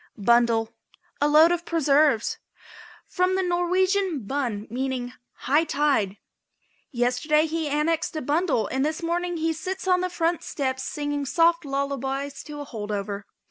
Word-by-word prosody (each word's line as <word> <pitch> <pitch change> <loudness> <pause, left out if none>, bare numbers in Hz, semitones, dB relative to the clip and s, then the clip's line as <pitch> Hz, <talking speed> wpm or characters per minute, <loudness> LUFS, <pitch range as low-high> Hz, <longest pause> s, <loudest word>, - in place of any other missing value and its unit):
BUNDLE. 230 +1 +3 0.5
A 290 - +4
load 310 +3 +6
of 345 -1 -1
preserves. 295 -7 +2 0.7
From 365 0 0
the 380 - +1
Norwegian 360 - +1
bun, 235 -5 -2
meaning 250 0 -3 0.3
high 290 +5 +4
tide. 280 - +1 0.7
"Yesterday 255 +5 +1
he 320 -1 -2
annexed 310 +3 0
a 310 - -2
bundle 290 - +1
and 265 +5 -1
this 315 +3 -2
morning 345 +1 -1
he 325 0 0
sits 370 +4 -5
on 365 -1 +3
the 365 - -1
front 340 -1 0
steps 260 -2 -3
singing 290 -1 -3
soft 335 +1 +3
lullabies 275 0 -3
to 295 -1 -7
a - - -6
hold 215 -6 -6
over." 200 0 -4
295 Hz, 145 wpm, -25 LUFS, 260-335 Hz, 0.7 s, load